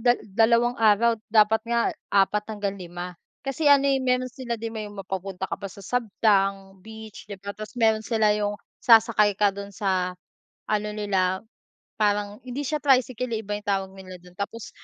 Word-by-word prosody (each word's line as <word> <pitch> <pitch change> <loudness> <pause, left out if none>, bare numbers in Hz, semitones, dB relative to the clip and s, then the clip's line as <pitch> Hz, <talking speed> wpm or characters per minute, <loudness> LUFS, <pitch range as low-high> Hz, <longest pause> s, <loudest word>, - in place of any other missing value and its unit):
dal 240 0 +6
dalawang 230 +4 +3
araw, 225 +1 +4
dapat 215 0 +4
nga 235 0 +2 0.3
4 200 +1 +2
hanggang 205 -2 -3
5. 175 0 -7 0.3
Kasi 275 +3 -2
ano 280 -1 +6
eh, 270 - +3
meron 255 -1 0
sila 245 -2 -4
din 230 0 -5
may 215 -2 -5
mapapunta 195 -2 -5
ka - - -3
pa - - -5
sa 195 +1 -11
Sabtang 195 -3 0
beach, 220 +2 -11
di 205 - -7
ba, 200 +1 -7
tas 215 +2 -9
meron 220 -2 +3
sila 220 -1 +2
yung 205 0 -1 0.2
sasakay 220 -3 +5
ka 205 +1 +3
dun 200 0 -9
sa 185 -3 0 0.6
ano 210 0 0
nila, 190 -3 0 0.6
parang 205 -1 0
hindi 255 +3 -4
siya 305 +3 -1
tricycle 255 -3 +2
eh, 220 - -2
iba 205 +1 -3
yung 210 - -16
tawag 195 -1 0
nila 190 -1 -10
do'n, 180 0 -17
tapos 200 +1 -5
210 Hz, 180 wpm, -25 LUFS, 195-230 Hz, 0.6 s, dal